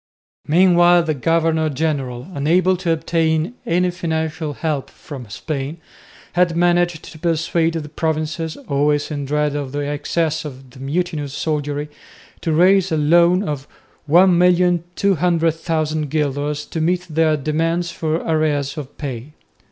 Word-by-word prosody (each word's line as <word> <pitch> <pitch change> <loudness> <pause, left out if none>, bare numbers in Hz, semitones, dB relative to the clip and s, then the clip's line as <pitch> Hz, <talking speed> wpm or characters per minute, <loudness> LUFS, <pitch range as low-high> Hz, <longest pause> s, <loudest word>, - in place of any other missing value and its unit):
Meanwhile 175 +1 +5
the 160 -1 0
governor 160 +2 +1
general, 135 -5 -2
unable 175 +6 +2
to 175 -1 -3
obtain 160 +3 0
any 180 +2 +2
financial 160 -3 -3
help 150 -3 -3
from 130 -7 -10
Spain, 140 +6 -4 0.6
had 175 -1 +2
managed 175 -1 +2
to 155 - -11
persuade 165 0 0
the 155 -2 -4
provinces, 155 +1 -2
always 145 +2 +1
in 145 -2 -3
dread 150 +1 0
of 140 -2 -4
the 145 - -2
excesses 155 +2 -1
of 135 -3 -10
the 130 - -15
mutinous 150 0 -2
soldiery, 150 -1 -2 0.5
to 165 - -1
raise 185 +4 +4
a 160 - +1
loan 170 +5 +4
of 145 -6 -4 0.4
1,200,000 175 -3 +2
guilders 145 0 -1
to 160 - -4
meet 180 +2 0
their 160 -1 +2
demands 165 +4 -1
for 160 -1 -2
arrears 155 -3 0
of 140 -1 -9
pay. 135 0 -6
160 Hz, 130 wpm, -20 LUFS, 145-170 Hz, 0.6 s, Meanwhile